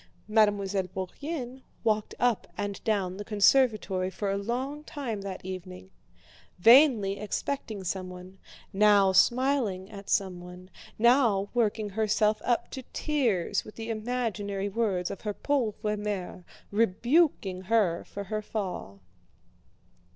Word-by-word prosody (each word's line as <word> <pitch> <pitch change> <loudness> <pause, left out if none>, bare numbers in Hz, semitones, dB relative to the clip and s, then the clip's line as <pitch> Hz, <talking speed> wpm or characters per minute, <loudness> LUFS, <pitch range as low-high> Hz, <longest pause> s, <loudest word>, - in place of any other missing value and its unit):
Mademoiselle 205 -3 +2
Bourienne 250 - -6 0.2
walked 215 -1 0
up 245 -2 +1
and 205 -1 -4
down 195 -4 0
the 205 - -5
conservatory 210 -3 +3
for 195 +1 -3
a - - 0
long 255 +8 -3
time 240 -9 -5
that 195 -2 -7
evening, 95 - -8 0.7
vainly 225 - +6
expecting 215 -1 -3
someone, 185 0 -6 0.3
now 200 -1 +5
smiling 220 -1 +2
at 200 -1 -10
someone, 180 -1 -2 0.3
now 230 -4 +3
working 220 -3 0
herself 215 +1 +1
up 240 -1 0
to 265 - -5
tears 245 - 0
with 215 - -12
the 225 0 -5
imaginary 215 -4 -2
words 200 -4 -1
of - - -7
her 210 -2 -3
pauvre 220 -6 -1
mère 200 -4 -4 0.3
rebuking 225 - +2
her 195 -5 +2
for 200 - -7
her 215 +2 -3
fall. 185 - -5
210 Hz, 120 wpm, -28 LUFS, 190-235 Hz, 0.7 s, vainly